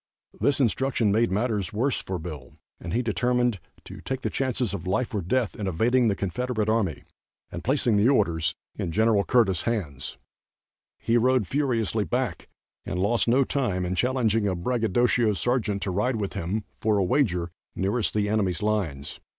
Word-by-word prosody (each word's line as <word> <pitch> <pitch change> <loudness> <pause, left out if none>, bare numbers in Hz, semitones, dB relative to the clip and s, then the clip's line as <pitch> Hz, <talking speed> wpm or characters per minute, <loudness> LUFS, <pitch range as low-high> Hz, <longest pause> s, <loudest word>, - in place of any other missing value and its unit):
This 145 -1 +2
instruction 125 -3 +1
made 115 +3 +3
matters 105 -2 0
worse 125 +6 0
for 95 - -4
Bill, 80 -6 -8 0.2
and 85 - -6
he 120 +6 +1
determined 120 +1 +1 0.3
to - - -10
take 130 -1 -4
the - - -2
chances 125 -5 -1
of 90 -2 -5
life 115 +7 0
or 105 - 0
death 110 +5 0
in 105 - -4
evading 120 +7 +2
the 100 - +2
Confederate 110 +4 -2
army 105 - 0 0.5
and 85 - -6
placing 125 -4 +2
the 105 +5 +4
orders 85 - +1 0.2
in 85 - -4
Gen. 110 +3 +3
Curtis' 105 -9 +3
hands. 80 - -3 0.8
He 115 - +1
rode 125 -1 +3
furiously 115 -5 0
back 120 -7 -2 0.3
and - - -4
lost 110 +7 +2
no 130 +4 +4
time 110 -10 -1
in 90 - -2
challenging 115 -2 +1
a 95 - 0
bragadocio 115 +3 +1
sergeant 105 -2 0
to 95 - -2
ride 105 +7 0
with 100 -3 -3
him, 100 +3 -2 0.2
for 105 -1 +2
a 100 - +2
wager, 90 - +1 0.2
nearest 105 +5 0
the 105 -1 +1
enemy's 100 -5 0
lines. 95 -11 -2
110 Hz, 170 wpm, -26 LUFS, 95-125 Hz, 0.8 s, the